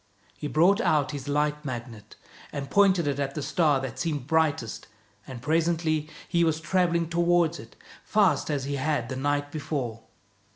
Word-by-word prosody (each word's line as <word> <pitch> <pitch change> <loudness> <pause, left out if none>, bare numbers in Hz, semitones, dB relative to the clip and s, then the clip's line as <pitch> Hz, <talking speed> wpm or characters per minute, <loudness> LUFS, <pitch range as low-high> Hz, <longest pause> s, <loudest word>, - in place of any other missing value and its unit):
He 150 - -5
brought 180 +9 +4
out 150 - +2
his 145 -2 -6
Light 150 +1 0
Magnet 120 -5 -7 0.4
and 140 -2 -5
pointed 190 -4 +4
it 140 -1 -1
at 135 -1 -2
the 150 - -3
star 150 -4 +2
that 130 -4 -6
seemed 150 -6 -2
brightest, 150 -7 0 0.4
and 125 -3 -8
presently 160 0 +1 0.2
he 170 -1 +2
was 160 -1 +1
traveling 170 0 +1
toward 170 0 +2
it - - -13
as - - -21
fast 210 -6 +3
as 145 -3 -1
he 140 +1 -2
had 140 -3 -1
the 130 - -3
night 145 +2 -1
before. 140 -7 -4
150 Hz, 170 wpm, -27 LUFS, 140-165 Hz, 0.4 s, brought